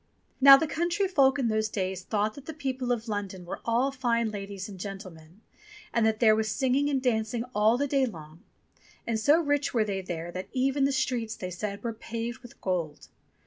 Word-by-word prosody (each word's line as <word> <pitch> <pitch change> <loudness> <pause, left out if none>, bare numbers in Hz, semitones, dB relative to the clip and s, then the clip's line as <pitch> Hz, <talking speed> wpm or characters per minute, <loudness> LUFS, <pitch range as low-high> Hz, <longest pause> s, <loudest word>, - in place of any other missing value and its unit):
Now 275 0 +11
the 320 - 0
country 345 +5 0
folk 275 -6 +3
in 260 -4 0
those 215 -1 0
days 190 -2 -3
thought 210 +1 -1
that 280 +2 -13
the 320 - -6
people 260 -4 -2
of 235 -1 -2
London 200 -4 -4
were 175 - -6
all 240 +4 +1
fine 235 -4 0
ladies 200 -1 -6
and 195 -3 -10
gentlemen, 185 -2 -9 0.5
and 230 - +2
that 220 -1 0
there 220 -3 +6
was 215 0 0
singing 265 +4 +1
and 275 -2 +1
dancing 230 -2 0
all 215 +2 +3
the 285 - 0
day 270 -1 +2
long, 160 -5 -10 0.6
and 225 -1 -1
so 290 +9 +4
rich 290 -4 0
were 220 -2 +3
they 195 -2 -2
there 175 -2 -5
that 185 +1 -6
even 270 +1 +1
the 275 - +2
streets, 240 -4 -1
they 185 -1 -6
said, 200 +4 -5
were 230 -1 -2
paved 230 +2 -5
with 245 -2 -15
gold. 175 -5 -3
225 Hz, 205 wpm, -28 LUFS, 200-265 Hz, 0.6 s, Now